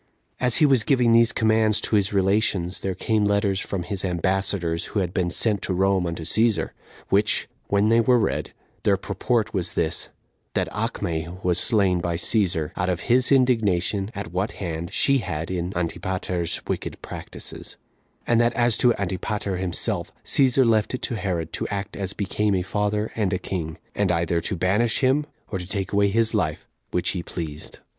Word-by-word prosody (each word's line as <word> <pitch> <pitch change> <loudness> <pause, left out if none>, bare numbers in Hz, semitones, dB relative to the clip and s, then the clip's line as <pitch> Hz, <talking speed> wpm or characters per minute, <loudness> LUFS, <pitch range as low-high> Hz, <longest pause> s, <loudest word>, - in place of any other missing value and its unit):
1. 125 - +1
As 125 - +2
he 155 - +5
was 135 -6 +4
giving 125 -3 +3
these 115 0 +5
commands 110 -1 +2
to - - -1
his 100 -2 +2
relations, 95 -2 +1
there 95 -1 -2
came 110 +1 +1
letters 100 -1 +2
from 95 -3 -3
his 100 +1 -3
ambassadors, 95 -1 0
who 105 - -2
had 90 -2 -2
been 90 -3 0
sent 105 +2 +1
to 95 - -2
Rome 95 -1 +2
unto 85 -1 -4
Cæsar, 110 0 +2 0.4
which, 105 +2 +2 0.2
when 100 +1 +2
they 115 +1 +5
were 125 +2 +4
read, 110 -4 -1 0.3
their - - +3
purport 115 -4 -1
was 90 -4 -1
this: 80 0 0 0.5
That - - +1
Acme 80 -1 -2 0.2
was 90 -1 +2
slain 95 -6 +3
by 85 -1 -1
Cæsar, 90 -5 +1
out 90 +1 -1
of 90 -1 -1
his 125 +2 +4
indignation 105 -7 +2
at 100 -4 -5
what 95 +4 -1
hand, 85 -2 -5
she 140 -1 +3
had 85 -5 -4
in 90 0 -2
Antipater's 90 0 -2
wicked - - -4
practices; - - -7 0.5
and 120 0 +3
that 120 0 +2
as 120 -1 +2
to 120 -2 +4
Antipater 95 +1 -2
himself, 90 -1 -2
Cæsar 130 -2 +4
left 110 +2 +2
it - - -8
to 120 - -2
Herod 90 -6 -3
to - - -2
act 100 -1 -4
as 95 -1 -3
became 105 0 0
a 90 - 0
father 105 +2 -1
and 105 -5 0
a - - +2
king, 80 -3 -4 0.2
and 100 -3 +1
either 85 0 +1
to 100 - -3
banish 105 +7 +1
him, 140 +3 +2 0.2
or 95 - -2
to 90 - -6
take 95 -1 -3
away 100 0 +4
his 110 +2 +1
life, - - -1 0.2
which 90 - 0
he 90 - -3
pleased. 80 -3 -6
100 Hz, 185 wpm, -24 LUFS, 90-110 Hz, 0.5 s, he